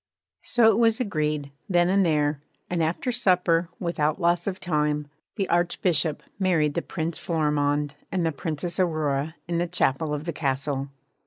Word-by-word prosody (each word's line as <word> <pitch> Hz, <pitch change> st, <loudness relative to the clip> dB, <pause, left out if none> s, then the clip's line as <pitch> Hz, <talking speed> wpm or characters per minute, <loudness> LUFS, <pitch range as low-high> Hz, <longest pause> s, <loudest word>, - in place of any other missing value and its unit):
So 235 Hz, -2 st, +3 dB
it 220 Hz, 0 st, +3 dB
was 225 Hz, 0 st, +4 dB
agreed, 150 Hz, -, -1 dB, 0.2 s
then 175 Hz, -2 st, +4 dB
and 195 Hz, +2 st, +3 dB
there; 150 Hz, -3 st, +1 dB, 0.3 s
and 175 Hz, -2 st, 0 dB
after 165 Hz, +10 st, 0 dB
supper, 180 Hz, -7 st, +2 dB
without 155 Hz, -2 st, 0 dB
loss 175 Hz, 0 st, +1 dB
of 190 Hz, -1 st, -2 dB
time, 150 Hz, -3 st, 0 dB, 0.3 s
the 195 Hz, -4 st, -1 dB
Archbishop 170 Hz, -2 st, +1 dB, 0.2 s
married 165 Hz, -6 st, +2 dB
the 170 Hz, -, -1 dB
Prince 165 Hz, -1 st, -3 dB
Florimond 150 Hz, -3 st, 0 dB, 0.2 s
and 180 Hz, -3 st, 0 dB
the 165 Hz, -, +1 dB
Princess 160 Hz, +4 st, -4 dB
Aurora 155 Hz, -3 st, 0 dB
in 170 Hz, -1 st, -1 dB
the 175 Hz, -, 0 dB
chapel 160 Hz, -3 st, +1 dB
of 150 Hz, 0 st, -2 dB
the 170 Hz, -, -3 dB
Castle. 140 Hz, -1 st, -2 dB
165 Hz, 160 wpm, -25 LUFS, 150-180 Hz, 0.3 s, was